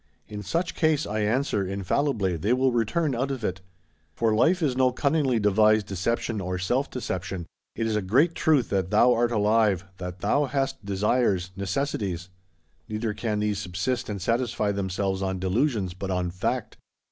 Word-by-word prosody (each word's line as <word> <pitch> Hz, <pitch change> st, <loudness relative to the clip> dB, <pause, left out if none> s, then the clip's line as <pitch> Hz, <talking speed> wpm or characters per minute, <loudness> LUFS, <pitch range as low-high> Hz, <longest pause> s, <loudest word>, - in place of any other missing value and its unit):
In 105 Hz, -1 st, -6 dB
such 165 Hz, -, -1 dB
case, 155 Hz, -2 st, +2 dB
I 105 Hz, +1 st, -2 dB
answer, 105 Hz, 0 st, +1 dB
infallibly 100 Hz, +1 st, 0 dB
they 100 Hz, +9 st, +1 dB
will 130 Hz, +1 st, +2 dB
return 125 Hz, +6 st, 0 dB
out 130 Hz, +3 st, -1 dB
of 130 Hz, -4 st, -4 dB
it! 95 Hz, -2 st, -2 dB, 0.5 s
For 115 Hz, -2 st, +2 dB
life 165 Hz, +11 st, +3 dB
is 135 Hz, -5 st, +1 dB
no 130 Hz, 0 st, +3 dB
cunningly 140 Hz, -1 st, +1 dB
devised 105 Hz, +1 st, +4 dB
deception 105 Hz, +3 st, -2 dB
or 90 Hz, 0 st, -3 dB
self 120 Hz, +10 st, 0 dB
deception: 90 Hz, -7 st, -4 dB, 0.3 s
it 115 Hz, -, -1 dB
is 110 Hz, -1 st, 0 dB
a 105 Hz, -, +1 dB
great 130 Hz, -, +3 dB
truth 150 Hz, -8 st, +2 dB
that 95 Hz, -2 st, 0 dB
thou 115 Hz, +4 st, +5 dB
art 120 Hz, 0 st, +1 dB
alive, 105 Hz, -3 st, +2 dB
that 90 Hz, 0 st, -7 dB
thou 145 Hz, +1 st, +2 dB
hast 135 Hz, -5 st, -2 dB
desires, 100 Hz, -1 st, +1 dB
necessities; 100 Hz, -, -2 dB, 0.6 s
neither 110 Hz, 0 st, -2 dB
can 105 Hz, -1 st, -2 dB
these 105 Hz, -2 st, 0 dB
subsist 100 Hz, +7 st, -2 dB
and 100 Hz, -1 st, -3 dB
satisfy 115 Hz, +1 st, 0 dB
themselves 95 Hz, 0 st, -2 dB
on 95 Hz, -1 st, -1 dB
delusions, 95 Hz, 0 st, 0 dB
but 95 Hz, +1 st, -5 dB
on 90 Hz, -1 st, -1 dB
fact. 90 Hz, -, -3 dB
105 Hz, 170 wpm, -26 LUFS, 95-125 Hz, 0.6 s, thou